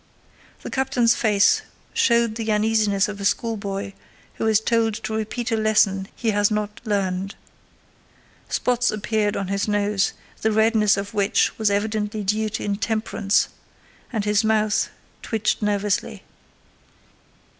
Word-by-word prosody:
The -, -, -6 dB
captain's 265 Hz, -3 st, +2 dB
face 215 Hz, -, +3 dB, 0.3 s
showed 235 Hz, -2 st, +3 dB
the 220 Hz, -1 st, -2 dB
uneasiness 210 Hz, -2 st, +2 dB
of 205 Hz, -1 st, -7 dB
a -, -, -4 dB
schoolboy 200 Hz, -2 st, -2 dB, 0.5 s
who 225 Hz, -, +1 dB
is 220 Hz, -1 st, +4 dB
told 225 Hz, -1 st, +1 dB
to 220 Hz, -, -5 dB
repeat 225 Hz, +3 st, -3 dB
a -, -, +2 dB
lesson 210 Hz, -3 st, +2 dB
he 225 Hz, -2 st, 0 dB
has 205 Hz, 0 st, +2 dB
not 210 Hz, -1 st, -3 dB
learned. 195 Hz, -3 st, -1 dB, 1.1 s
Spots 245 Hz, 0 st, +1 dB
appeared 215 Hz, 0 st, -1 dB
on 195 Hz, -, -3 dB
his 200 Hz, +1 st, -1 dB
nose, 205 Hz, -1 st, +1 dB, 0.3 s
the 220 Hz, -, +2 dB
redness 215 Hz, -1 st, +3 dB
of 200 Hz, +1 st, -4 dB
which 200 Hz, -1 st, +1 dB
was 215 Hz, -1 st, +3 dB
evidently 210 Hz, +1 st, -1 dB
due 215 Hz, +2 st, 0 dB
to 215 Hz, -, -4 dB
intemperance, 205 Hz, 0 st, 0 dB, 0.6 s
and 215 Hz, -4 st, -2 dB
his 210 Hz, +1 st, +2 dB
mouth 215 Hz, -1 st, +1 dB, 0.3 s
twitched 220 Hz, 0 st, -1 dB
nervously. 205 Hz, -1 st, -1 dB
210 Hz, 135 wpm, -23 LUFS, 205-220 Hz, 1.1 s, is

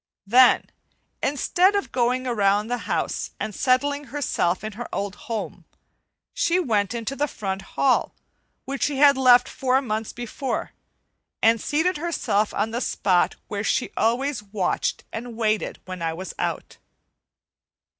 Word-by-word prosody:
Then, 245 Hz, +5 st, +5 dB, 0.5 s
instead 360 Hz, +7 st, +2 dB
of 400 Hz, -, -1 dB
going 255 Hz, +1 st, +1 dB
around 210 Hz, -2 st, +1 dB
the 245 Hz, 0 st, -1 dB
house -, -, -1 dB
and 215 Hz, -, -3 dB
settling 285 Hz, +5 st, +1 dB
herself 235 Hz, -10 st, -1 dB
in 215 Hz, -, -4 dB
her 230 Hz, +3 st, -7 dB
old 200 Hz, -1 st, -3 dB, 0.2 s
home, 225 Hz, -2 st, -4 dB, 0.7 s
she 340 Hz, +2 st, +2 dB
went 220 Hz, -, 0 dB
into 235 Hz, +3 st, -3 dB
the 290 Hz, +2 st, 0 dB
front 195 Hz, -6 st, -4 dB, 0.2 s
hall 265 Hz, -2 st, +2 dB, 0.5 s
which 275 Hz, 0 st, -5 dB
she 290 Hz, -2 st, 0 dB
had 285 Hz, 0 st, +7 dB
left 250 Hz, -2 st, +6 dB
four 260 Hz, 0 st, +1 dB
months 220 Hz, -4 st, -3 dB
before, 240 Hz, +3 st, -4 dB, 0.7 s
and 225 Hz, 0 st, +4 dB
seated 320 Hz, +4 st, +1 dB
herself 290 Hz, -10 st, 0 dB
on 215 Hz, +2 st, -1 dB
the 240 Hz, +2 st, -2 dB
spot 185 Hz, -8 st, +1 dB
where 205 Hz, -1 st, -3 dB
she -, -, 0 dB
always 250 Hz, +2 st, 0 dB
watched 195 Hz, -3 st, -2 dB
and 230 Hz, 0 st, -6 dB
waited 215 Hz, -2 st, 0 dB
when 185 Hz, -1 st, -7 dB
I 165 Hz, -1 st, -1 dB
was 185 Hz, +3 st, -7 dB
out. -, -, -3 dB
240 Hz, 145 wpm, -24 LUFS, 210-275 Hz, 0.7 s, had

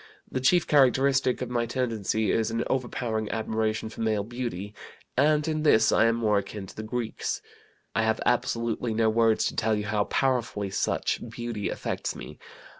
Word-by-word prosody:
The 130 Hz, -, -1 dB
chief 165 Hz, +7 st, +4 dB
characteristic 135 Hz, -2 st, +3 dB
of 125 Hz, -, -6 dB
my 120 Hz, -1 st, 0 dB
tendency 110 Hz, -4 st, 0 dB
is 110 Hz, -1 st, +1 dB
an 115 Hz, +1 st, -1 dB
overpowering 120 Hz, -4 st, -2 dB
admiration 110 Hz, 0 st, -1 dB
for 110 Hz, -, -8 dB
male 110 Hz, -2 st, +1 dB
beauty, 110 Hz, -4 st, -5 dB, 0.4 s
and 150 Hz, +3 st, +3 dB
in 155 Hz, -1 st, 0 dB
this 145 Hz, -7 st, +5 dB
I -, -, +4 dB
am 115 Hz, 0 st, +3 dB
more 105 Hz, -3 st, +2 dB
akin 100 Hz, 0 st, -7 dB
to -, -, -13 dB
the -, -, -5 dB
Greeks. 115 Hz, +1 st, -3 dB, 0.5 s
"I -, -, +2 dB
have 110 Hz, 0 st, +1 dB
absolutely 115 Hz, -1 st, 0 dB
no 110 Hz, 0 st, +3 dB
words 115 Hz, 0 st, +3 dB
to -, -, -2 dB
tell 110 Hz, 0 st, +1 dB
you 105 Hz, 0 st, -2 dB
how 105 Hz, -1 st, 0 dB
powerfully 115 Hz, -7 st, 0 dB
such -, -, 0 dB
beauty 115 Hz, -3 st, -4 dB
affects -, -, -3 dB
me. -, -, -9 dB
115 Hz, 175 wpm, -27 LUFS, 110-125 Hz, 0.5 s, this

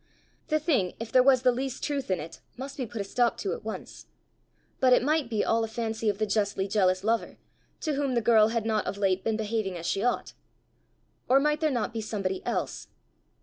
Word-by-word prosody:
The 310 Hz, -1 st, +1 dB
thing, 265 Hz, -, +1 dB
if 225 Hz, 0 st, -6 dB
there 255 Hz, -, +6 dB
was 260 Hz, -1 st, +4 dB
the 250 Hz, -, +5 dB
least 260 Hz, +1 st, -4 dB
truth 285 Hz, -5 st, -2 dB
in 185 Hz, -, +1 dB
it, 160 Hz, +2 st, -8 dB, 0.2 s
must 270 Hz, +2 st, -6 dB
be 255 Hz, -4 st, -4 dB
put 220 Hz, -1 st, -5 dB
a -, -, -1 dB
stop 240 Hz, +4 st, +1 dB
to 195 Hz, -, -2 dB
at -, -, -7 dB
once! 220 Hz, 0 st, -7 dB, 0.7 s
but 255 Hz, -1 st, +5 dB
it 250 Hz, -, +4 dB
might 300 Hz, -2 st, +1 dB
be 220 Hz, -3 st, 0 dB
all 225 Hz, 0 st, +2 dB
a -, -, -1 dB
fancy 225 Hz, -1 st, -2 dB
of 200 Hz, -, -1 dB
the 215 Hz, -, 0 dB
justly 200 Hz, -2 st, 0 dB
jealous 185 Hz, -2 st, +2 dB
lover, 225 Hz, +2 st, 0 dB, 0.4 s
to 310 Hz, -, -1 dB
whom 275 Hz, -2 st, 0 dB
the -, -, +4 dB
girl 220 Hz, -1 st, +5 dB
had 225 Hz, -1 st, -1 dB
not 220 Hz, -1 st, 0 dB
of 200 Hz, -, -3 dB
late 190 Hz, -2 st, +1 dB
been 220 Hz, -1 st, 0 dB
behaving 215 Hz, -4 st, -2 dB
as 170 Hz, -, -7 dB
she 195 Hz, -, 0 dB
ought! 245 Hz, -, -1 dB, 1.0 s
Or 265 Hz, +2 st, +6 dB
might 300 Hz, +1 st, +1 dB
there 310 Hz, -, +3 dB
not 240 Hz, -4 st, -1 dB
be 225 Hz, -, -3 dB
somebody 195 Hz, -3 st, -3 dB
else? -, -, -2 dB
225 Hz, 225 wpm, -28 LUFS, 205-255 Hz, 1.0 s, there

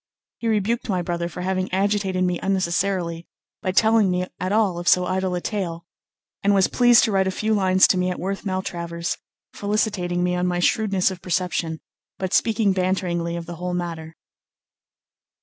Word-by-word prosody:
He 230 Hz, -, -3 dB
rebuked 225 Hz, +2 st, 0 dB
my 185 Hz, -3 st, 0 dB
brother 170 Hz, 0 st, -2 dB
for 180 Hz, -, -7 dB
having 185 Hz, 0 st, -1 dB
agitated 195 Hz, -1 st, 0 dB
me 180 Hz, -1 st, 0 dB
unnecessarily 185 Hz, -2 st, -1 dB, 0.3 s
by 185 Hz, -, -1 dB
telling 220 Hz, 0 st, +4 dB
me 180 Hz, 0 st, 0 dB
at 185 Hz, -, -2 dB
all 205 Hz, -5 st, +2 dB
of 175 Hz, -, -7 dB
so 180 Hz, 0 st, +5 dB
idle 185 Hz, 0 st, -1 dB
a 175 Hz, -, -3 dB
tale; 175 Hz, -5 st, -3 dB, 0.6 s
and 200 Hz, 0 st, +3 dB
was 190 Hz, -1 st, +4 dB
pleased 240 Hz, -1 st, +5 dB
to 220 Hz, -, +1 dB
write 190 Hz, -1 st, +2 dB
a -, -, +2 dB
few 215 Hz, +3 st, -1 dB
lines 190 Hz, -2 st, +4 dB
to 185 Hz, -, +2 dB
me 180 Hz, 0 st, +1 dB
at 180 Hz, -, -4 dB
Worth 195 Hz, +2 st, -3 dB
Maltravers, 170 Hz, -3 st, -3 dB, 0.4 s
felicitating 200 Hz, -4 st, -1 dB
me 180 Hz, 0 st, +1 dB
on 180 Hz, 0 st, 0 dB
my 175 Hz, 0 st, 0 dB
shrewdness 195 Hz, +1 st, +2 dB
of 185 Hz, -1 st, -8 dB
perception, 175 Hz, -2 st, -2 dB, 0.4 s
but 190 Hz, -1 st, -3 dB
speaking 220 Hz, -3 st, +2 dB
banteringly 180 Hz, -2 st, -1 dB
of 170 Hz, -, -6 dB
the 170 Hz, 0 st, -8 dB
whole 180 Hz, +1 st, -3 dB
matter. 165 Hz, -2 st, -5 dB
185 Hz, 180 wpm, -23 LUFS, 175-200 Hz, 0.6 s, so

